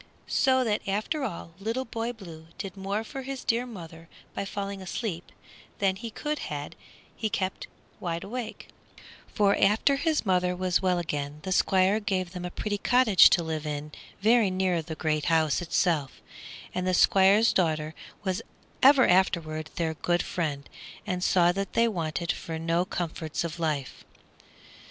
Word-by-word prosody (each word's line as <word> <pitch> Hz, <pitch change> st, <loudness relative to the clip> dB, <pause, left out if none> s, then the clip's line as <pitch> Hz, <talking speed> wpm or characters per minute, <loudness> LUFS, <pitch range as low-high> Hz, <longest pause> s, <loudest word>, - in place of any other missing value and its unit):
So 260 Hz, -1 st, +3 dB
that 215 Hz, -3 st, 0 dB
after 215 Hz, +10 st, -1 dB
all 170 Hz, -8 st, -5 dB
Little 230 Hz, +6 st, -2 dB
Boy 230 Hz, 0 st, -3 dB
Blue 170 Hz, -8 st, -11 dB
did 195 Hz, -2 st, -6 dB
more 200 Hz, +2 st, -2 dB
for 270 Hz, +4 st, -7 dB
his 265 Hz, 0 st, -6 dB
dear 245 Hz, -1 st, +1 dB
mother 165 Hz, -6 st, -10 dB, 0.2 s
by 200 Hz, -, -3 dB
falling 200 Hz, 0 st, -5 dB
asleep 185 Hz, -2 st, -4 dB, 0.5 s
than 195 Hz, -2 st, +1 dB
he 230 Hz, +4 st, -6 dB
could 300 Hz, +6 st, -3 dB
had 145 Hz, -1 st, -5 dB, 0.4 s
he 220 Hz, -, -2 dB
kept 190 Hz, -2 st, -2 dB, 0.3 s
wide 170 Hz, -1 st, -3 dB
awake; 230 Hz, +1 st, -6 dB, 0.6 s
for 200 Hz, -1 st, +2 dB
after 220 Hz, +8 st, +3 dB
his 310 Hz, -2 st, 0 dB
mother 180 Hz, -1 st, +2 dB
was 185 Hz, -1 st, +1 dB
well 185 Hz, -2 st, +2 dB
again 145 Hz, -4 st, -3 dB
the 190 Hz, -, -4 dB
Squire 190 Hz, +2 st, +3 dB
gave 190 Hz, -4 st, -2 dB
them 180 Hz, -1 st, -6 dB
a -, -, -3 dB
pretty 205 Hz, +3 st, -3 dB
cottage 245 Hz, -4 st, +6 dB
to 175 Hz, -, +3 dB
live 160 Hz, -1 st, -3 dB
in 150 Hz, 0 st, -4 dB, 0.3 s
very 220 Hz, 0 st, +4 dB
near 185 Hz, -1 st, +1 dB
to 160 Hz, -, -17 dB
the 160 Hz, -, -4 dB
great 155 Hz, -1 st, -1 dB
house 160 Hz, -1 st, +2 dB
itself, 165 Hz, -5 st, +1 dB, 0.6 s
and 185 Hz, 0 st, -2 dB
the 185 Hz, -, +2 dB
Squire's 195 Hz, +5 st, +5 dB
daughter 155 Hz, -3 st, 0 dB, 0.3 s
was 190 Hz, -2 st, -1 dB, 0.4 s
ever 270 Hz, -1 st, +7 dB
afterward 160 Hz, -4 st, +1 dB
their 165 Hz, -2 st, -1 dB
good 175 Hz, +3 st, 0 dB
friend, 145 Hz, -5 st, -3 dB, 0.4 s
and 180 Hz, -3 st, -2 dB
saw 175 Hz, -2 st, +4 dB
that 195 Hz, +2 st, -4 dB
they 230 Hz, 0 st, +4 dB
wanted 170 Hz, -4 st, -2 dB
for 165 Hz, -1 st, -5 dB
no 165 Hz, +2 st, 0 dB
comforts 165 Hz, -4 st, -3 dB
of 170 Hz, 0 st, -5 dB
life. 150 Hz, -5 st, -2 dB
185 Hz, 165 wpm, -27 LUFS, 165-210 Hz, 0.6 s, ever